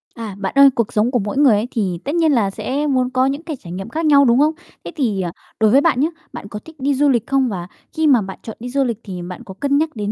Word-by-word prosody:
À, 220 -4 -6
bạn 195 -1 -3
ơi, 275 0 +8
cuộc 230 -3 -1
sống 215 +3 +2
của 250 - +1
mỗi 205 +4 -4
người 280 -5 +5
ấy, 210 +3 -1
thì 190 -7 -2
tất 290 +4 -3
nhiên 325 -3 +3
là 225 -7 +2
sẽ 275 +9 -3
muốn 255 -3 +1
có 255 0 +1
những 280 +4 -2
cái 320 -3 -5
trải 175 -10 -12
nghiệm 195 +5 -6
khác 320 +6 -3
nhau, 285 -2 +6
đúng 240 +1 +4
không? 305 +2 +3 0.3
Thế - - -7
thì, 225 - 0
ờ, 175 -2 -3 0.3
đối 220 -1 +4
với 275 - +5
bạn 290 -5 +2
nhá, 295 - +3 0.3
bạn 200 - -8
có 210 - -7
thích 320 - -13
đi 280 +2 +1
du 290 +2 +3
lịch 240 -5 +1
không? 270 -2 +1
Và 180 -4 -5 0.3
khi 320 -1 +1
mà 260 -6 +5
bạn 190 -1 -7
chọn 220 - -8
đi 245 +2 -6
du 275 +2 +1
lịch 235 -4 -2
thì 185 -3 -7
bạn 180 +6 -8
có 200 -5 -10
cân 280 +8 0
nhắc 310 -1 -1
đến 210 -1 -3
250 Hz, 310 wpm, -19 LUFS, 205-280 Hz, 0.3 s, ơi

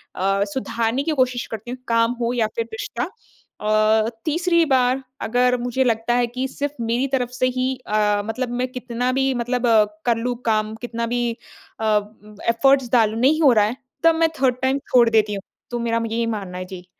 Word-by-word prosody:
अ, 195 +1 +1
सुधारने 235 0 -1
की 325 - -1
कोशिश 255 -4 +1
करती 225 +2 -7
हूँ, 255 - -5
काम 230 0 +3
हो 235 +1 0
या 230 -3 +1
फिर 460 - -1
रिश्ता। 450 - -4 0.6
अ, 215 +1 +3 0.2
तीसरी 340 +2 +2
बार 260 -1 +2 0.2
अगर 250 +2 +2
मुझे 245 +2 0
लगता 230 -1 +1
है 245 -1 +2
कि 255 +3 -3
सिर्फ़ 285 +2 -4
मेरी 235 +4 0
तरफ 255 -2 -1
से 255 0 0
ही 260 +1 +1
अ, 210 -1 +2
मतलब 235 +3 -3
मैं 255 - 0
कितना 250 0 -2
भी 270 +1 +1
मतलब 245 0 -1
अ, 220 -2 +6 0.2
कर 235 -2 +2
लूँ 245 +2 -2
काम, 215 -1 0
कितना 235 -1 -3
भी 240 -1 0 0.5
अ, 215 -1 +3 0.5
एफर्ट्स 260 +2 +3
डालूँ, 225 -2 +3
नहीं 295 +6 +3
हो 280 -5 +7
रहा 210 -2 +4
है। 230 +4 -3 0.3
तब 330 -1 +5
मैं 325 0 +3
3 255 -2 +3
टाइम 265 +1 +2 0.2
छोड़ 240 -2 +6
देती 215 -2 +2
हूँ। 195 - -5 0.3
तो 240 - -2
मेरा 230 0 0
म 230 - -2
यही 230 +1 0
मानना 200 -5 -4
है 185 - -5
जी। 180 -1 -10
240 Hz, 200 wpm, -22 LUFS, 225-255 Hz, 0.6 s, हो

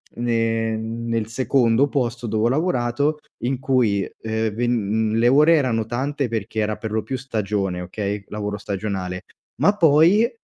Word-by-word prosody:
ne 115 -1 0
nel 115 0 -3
secondo 125 +1 +2
posto 120 -3 -2
dove 110 0 0
ho 120 - +3
lavorato, 145 -1 0 0.3
in 130 0 -1
cui, 125 -7 +2 0.2
ehm, 110 0 -1
ven 110 -2 0
le 115 +1 +3
ore 150 +5 +6
erano 115 -7 +1
tante, 135 +4 -2
perché 110 -1 -3
era 105 0 0
per 110 0 -6
lo 110 - 0
più 120 +5 -4
stagione, 105 -7 -2
okay, 100 +2 -4
lavoro 105 -1 -4
stagionale, 95 -3 -4 0.4
ma 200 - +5
poi, 170 - +5
115 Hz, 150 wpm, -22 LUFS, 105-130 Hz, 0.4 s, ore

